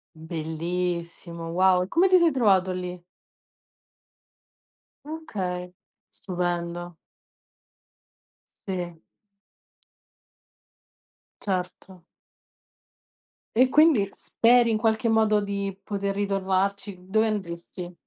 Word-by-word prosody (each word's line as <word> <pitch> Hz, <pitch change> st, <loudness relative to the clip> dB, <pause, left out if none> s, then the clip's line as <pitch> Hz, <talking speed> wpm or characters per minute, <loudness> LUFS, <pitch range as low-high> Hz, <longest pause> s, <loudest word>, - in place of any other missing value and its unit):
Bellissimo! 170 Hz, +1 st, -4 dB
Wow. 185 Hz, +1 st, +4 dB
E 180 Hz, -, -6 dB
come 360 Hz, -, +3 dB
ti 370 Hz, -, +7 dB
sei 340 Hz, -2 st, +4 dB
trovato 190 Hz, -7 st, +3 dB
lì? 180 Hz, -1 st, -5 dB, 2.0 s
Okay, 185 Hz, -, -5 dB, 0.4 s
stupendo. 175 Hz, -1 st, -3 dB, 1.7 s
Sì. 175 Hz, -3 st, -4 dB, 2.4 s
Certo. 185 Hz, -1 st, -4 dB, 1.5 s
E 255 Hz, +2 st, +6 dB
quindi 290 Hz, -7 st, +5 dB
speri 235 Hz, 0 st, +3 dB
in 220 Hz, -, +2 dB
qualche 225 Hz, +1 st, +1 dB
modo 215 Hz, -1 st, +3 dB
di 200 Hz, -1 st, -3 dB
poter 200 Hz, -1 st, -2 dB
ritornarci? 195 Hz, -1 st, -1 dB
Dove 220 Hz, +4 st, +2 dB
andresti? 175 Hz, -3 st, -5 dB
190 Hz, 75 wpm, -25 LUFS, 180-215 Hz, 2.4 s, ti